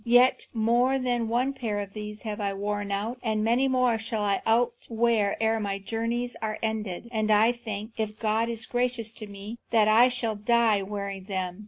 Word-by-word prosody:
Yet 245 +2 +4
more 240 +4 +2
than 245 -3 0
one 250 +4 +1
pair 225 -6 -3
of 200 -1 -6
these 210 0 -7
have 215 -1 -4
I 200 -1 -1
outworn, 205 0 -3 0.3
and 220 -3 0
many 240 +4 +3
more 255 -3 +2
shall 220 -1 -2
I 200 -1 +1
outwear 230 -2 +1
ere 225 0 +2
my 200 -2 -2
journeys 230 +4 -2
are 215 -1 -2
ended. 220 -2 -3
And 215 -2 0
I 215 +2 +5
think, 220 -2 -6
if 215 -1 -3
God 220 +1 +1
is 225 -1 -3
gracious 245 -2 -1
to 215 -1 -8
me, 205 +3 -8
that 220 -2 +4
I 230 +4 +6
shall 235 -3 -1
die 220 -1 +3
wearing 200 -1 -5
them. 185 -2 -3
220 Hz, 185 wpm, -27 LUFS, 210-235 Hz, 0.3 s, I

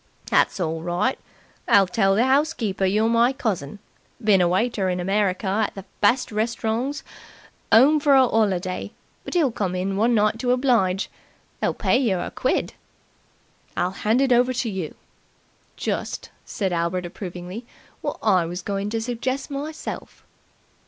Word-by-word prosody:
"That's - - +3
orl 160 -2 -2
right. 175 +10 -1 0.5
I'll 200 -1 +6
tell 195 +1 +2
the 225 - +3
'ousekeeper 260 -8 +1
you're 215 +2 +2
my 235 +2 +4
cousin 200 - -3 0.5
been 205 -3 +5
a 175 - +4
waiter 190 +1 0
in 180 0 -1
America 195 +1 0
at 205 +3 0
the 195 -1 -8 0.2
best 235 +5 +3
restaurongs 230 +6 -2 0.7
'ome 280 +7 +6
for 285 -1 +4
a 265 -1 +6
'oliday, 190 -6 -1 0.3
but'll 320 -8 +1
come 190 -5 -2
in 185 +2 -1
for 195 - -3
one 230 +3 +3
night 215 +1 +2
to 250 - -1
oblige. 235 -7 +2 0.5
They'll - - 0
pay 245 - +2
yer 210 -9 +1
a - - -4
quid." - - -1 1.0
"I'll 180 +1 +1
hand 220 +6 +1
it 270 -2 +2
over 250 +1 +3
to 235 -2 -2
you." 185 -6 -5 0.8
"Just," - - -3
said 190 -3 -2
Albert 170 +1 -1
approvingly, 180 +4 -7 0.3
"wot - - -3
I 180 -3 +3
was 175 +1 -5
goin' 200 +1 -2
to 225 +1 -2
suggest 255 +4 -3
myself." 295 +3 -6
210 Hz, 150 wpm, -23 LUFS, 185-245 Hz, 1.0 s, I'll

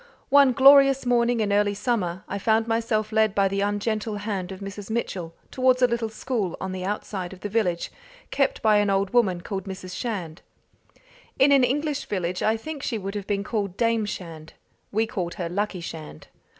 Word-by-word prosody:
One 280 -2 +6
glorious 275 +1 +6
morning 240 -1 +2
in 205 -1 0
early 205 0 +2
summer 190 -6 -1
I 200 - -4
found 220 +2 +2
myself 225 -1 0
led 220 -2 +2
by 200 -1 +3
the 195 +1 -1
ungentle 210 +1 -1
hand 200 -3 -4
of 190 - -8
Mrs. 200 0 -8
Mitchell 185 -7 -3 0.2
towards 255 0 +2
a - - +7
little 235 -2 -2
school 215 -5 -3
on 190 - -4
the 185 -1 -5
outside 190 -2 -4
of 185 - -14
the 205 - -4
village, 190 -6 0 0.4
kept 275 -1 0
by 215 -1 +5
an 205 -1 +2
old 195 0 +1
woman 195 -8 +2
called 195 0 -5
Mrs. 185 -1 -7
Shand. 185 -8 -4 1.0
In 275 +1 +5
an 275 -2 +6
English 290 +3 -1
village 180 -2 -2
I 220 +1 +2
think 295 +5 -7
she 235 - -2
would 195 -1 -5
have 205 -2 -5
been 200 -1 -1
called 200 -4 -3
Dame 230 -2 +1
Shand: 165 -5 -7 0.4
we 220 +2 +1
called 180 -6 -4
her 175 - -3
Luckie 200 0 -2
Shand. 155 - -9
205 Hz, 190 wpm, -25 LUFS, 190-235 Hz, 1.0 s, a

